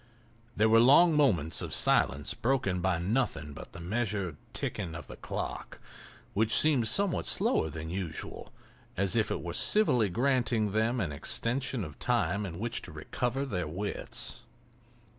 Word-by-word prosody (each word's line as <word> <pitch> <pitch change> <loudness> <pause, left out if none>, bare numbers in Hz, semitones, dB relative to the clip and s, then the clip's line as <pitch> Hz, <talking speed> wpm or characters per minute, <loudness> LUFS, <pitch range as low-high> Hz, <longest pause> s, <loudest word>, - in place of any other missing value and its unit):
There 110 - +4
were 115 +1 +6
long 150 +7 +6
moments 90 - +2
of - - -2
silence 70 +1 +2
broken 115 -8 0
by 95 -1 +1
nothing 85 - -1
but 75 - -10
the 90 - -9
measured 100 -2 -2 0.2
ticking 90 -6 -4
of 80 - -7
the - - -10
clock, - - -6 0.5
which 110 +2 +2
seemed 140 -7 +3
somewhat 195 - +2
slower 80 - +2
than 80 +2 -6
usual, 90 -4 -5 0.5
as 100 +1 +1
if 110 -3 +2
it - - -3
were 85 0 -4
civilly 125 - +3
granting 120 -1 +1
them 110 +4 +1
an 85 -8 -1
extension 120 - -2
of 75 -4 -9
time 100 +5 0
in 85 -2 -7
which 115 +4 -3
to - - -9
recover 125 - -3
their 90 - -3
wits. 100 +6 -4
105 Hz, 155 wpm, -30 LUFS, 85-120 Hz, 0.5 s, were